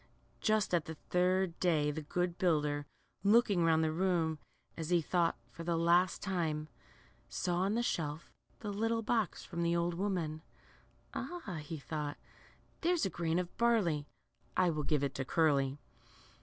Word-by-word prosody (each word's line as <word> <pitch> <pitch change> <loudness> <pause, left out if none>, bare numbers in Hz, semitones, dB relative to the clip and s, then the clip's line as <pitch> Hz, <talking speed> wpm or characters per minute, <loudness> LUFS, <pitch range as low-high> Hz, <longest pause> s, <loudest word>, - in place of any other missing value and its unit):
Just 215 -3 +1
at 170 -3 +2
the 160 - -6
third 180 +2 +1
day 155 -5 +2
the 155 +2 -4
good 175 +3 -2
builder, 150 -4 +1 0.4
looking 205 -3 +4
round 160 -1 +4
the 155 - +1
room, 165 -2 +1 0.4
as 160 -1 -4
he 175 -1 +4
thought, 170 -2 +1
for 165 - -8
the 170 0 0
last 170 +2 +3
time, 160 -5 -1 0.6
saw 175 -2 -1
on 195 +4 +1
the 240 - +1
shelf 155 -7 -2 0.3
the 210 - -3
little 225 +2 0
box 220 -3 0
from 170 - -4
the 170 0 +2
old 170 0 +1
woman. 170 -4 -2 0.7
Ah,'' 270 - -5
he 155 +2 -6
thought, 150 0 -4 0.6
there's 345 0 +2
a 195 - -1
grain 165 -1 0
of 180 -1 -3
barley; 195 -11 +2 0.5
I 180 -2 +4
will 155 -1 -2
give 145 0 +1
it 140 - 0
to 135 - -2
Curly." 140 -2 +2
170 Hz, 160 wpm, -34 LUFS, 155-190 Hz, 0.7 s, looking